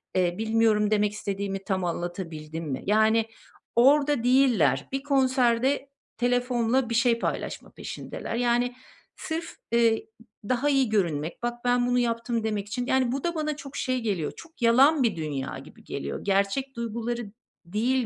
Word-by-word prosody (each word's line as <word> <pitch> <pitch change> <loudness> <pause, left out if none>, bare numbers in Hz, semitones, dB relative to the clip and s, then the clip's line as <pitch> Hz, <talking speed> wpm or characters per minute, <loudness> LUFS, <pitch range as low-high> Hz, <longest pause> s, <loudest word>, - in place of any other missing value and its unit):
Eee, 180 -2 +2
bilmiyorum, 220 -1 +2
demek 210 -1 +2
istediğimi 200 -2 -3
tam 190 -1 -1
anlatabildim 165 -2 -4
mi? 130 - -4
Yani, 220 +2 +3 0.5
orada 280 +1 +4
değiller. 240 - +3
Bir 270 0 -2
konserde 265 -1 +2 0.3
telefonla 245 0 +1
bir 230 - -1
şey 235 0 +3
paylaşma - - -4
peşindeler. - - -6
Yani, 245 +1 +1 0.4
sırf, 325 +1 -5 0.2
ııı, 230 -1 +4 0.5
daha 255 +3 +2
iyi 270 -4 +3
görünmek, 170 -3 -1
"Bak 240 - 0
ben 245 0 +3
bunu 245 0 +2
yaptım." 230 -1 -1
demek 210 -2 -2
için, 245 +3 -3
yani, 260 -2 +2
bu 270 +1 -3
da 345 0 -1
bana 305 -2 -1
çok, 280 -2 -10
şey, 255 -1 0
geliyor, 195 -9 -1
çok 325 -6 -14
yalan 265 +5 +5
bir 230 -4 +1
dünya 145 -4 -4
gibi - - -16
geliyor. 70 +1 -5
Gerçek 200 +7 0
duyguları 235 -1 -4 0.3
değil 235 +7 0
235 Hz, 150 wpm, -26 LUFS, 200-255 Hz, 0.5 s, yalan